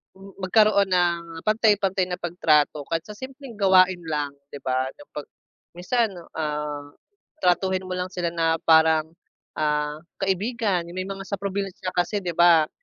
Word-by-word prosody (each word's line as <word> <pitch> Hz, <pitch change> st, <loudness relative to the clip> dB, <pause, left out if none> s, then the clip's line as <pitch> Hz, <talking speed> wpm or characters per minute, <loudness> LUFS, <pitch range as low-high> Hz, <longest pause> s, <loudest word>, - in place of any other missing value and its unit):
m 195 Hz, +1 st, -13 dB
magkaroon 200 Hz, 0 st, +4 dB
ng 170 Hz, -2 st, 0 dB
pantay-pantay 205 Hz, -3 st, +2 dB
na 180 Hz, -, -4 dB
pagtrato 155 Hz, -4 st, +1 dB
kahit 165 Hz, -1 st, 0 dB
sa 210 Hz, -, -9 dB
simpleng 265 Hz, -1 st, -9 dB
gawain 185 Hz, -2 st, +5 dB
lang 150 Hz, -2 st, -2 dB, 0.2 s
'di 145 Hz, -, -8 dB
ba? 130 Hz, 0 st, 0 dB
Na -, -, -13 dB
'pag 150 Hz, -, -4 dB, 0.5 s
minsan, 225 Hz, +4 st, 0 dB, 0.3 s
ah, 150 Hz, -1 st, -3 dB, 0.5 s
tratuhin 185 Hz, +1 st, +2 dB
mo 185 Hz, -, -4 dB
lang 180 Hz, 0 st, -3 dB
sila 180 Hz, -2 st, -2 dB
na 165 Hz, -1 st, +1 dB
parang, 160 Hz, -1 st, +5 dB, 0.5 s
ah, 150 Hz, -1 st, 0 dB, 0.3 s
kaibigan 195 Hz, 0 st, 0 dB
yung 175 Hz, -, -9 dB
may 185 Hz, -, -3 dB
mga 195 Hz, 0 st, -6 dB
sa 200 Hz, -, -3 dB
probinsya 195 Hz, -1 st, -3 dB
kasi 180 Hz, +4 st, 0 dB
'di 175 Hz, -1 st, -3 dB
ba, 170 Hz, -2 st, +6 dB
180 Hz, 155 wpm, -24 LUFS, 160-195 Hz, 0.5 s, ba